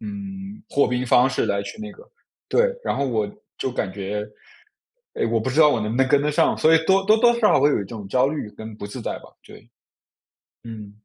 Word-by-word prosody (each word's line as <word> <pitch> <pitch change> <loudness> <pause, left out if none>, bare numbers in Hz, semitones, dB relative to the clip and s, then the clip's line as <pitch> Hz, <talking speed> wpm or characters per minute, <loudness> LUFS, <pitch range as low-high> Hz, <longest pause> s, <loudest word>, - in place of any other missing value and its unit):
嗯， 200 -1 -8
破 140 - +4
冰 125 0 -1
方 125 +2 +5
式 - - -1
来 100 0 0 0.2
那 215 0 -6
个， 460 - -15 0.5
对。 - - +2
然 - - -1
后 140 - 0
我 110 -4 -1 0.3
就 130 - -2
感 95 -6 -3
觉， 105 +1 -4 0.9
哎， - - -1
我 115 0 +1
不 115 +4 -2
知 140 +5 +2
道 150 - +8
我 125 - +1
能 105 0 -2
不 115 - -3
能 130 - +3
跟 140 0 +3
得 150 - +1
上。 - - +2
所 160 +1 +4
以 165 - +6
多 195 0 +3
多 215 +2 +5
多 240 +1 +5
少 230 -3 +3
少 - - +4
会 145 - +5
有 - - +1
一 100 - -4
种 105 -1 -9
焦 125 +5 +2
虑 145 -8 -4
跟 110 0 -9
不 100 - -7
自 105 - -8
在 - - -4
吧。 - - -16 0.2
对。 - - -15 1.0
嗯。 110 -3 -9
130 Hz, 255 characters per minute, -22 LUFS, -, 1.0 s, 道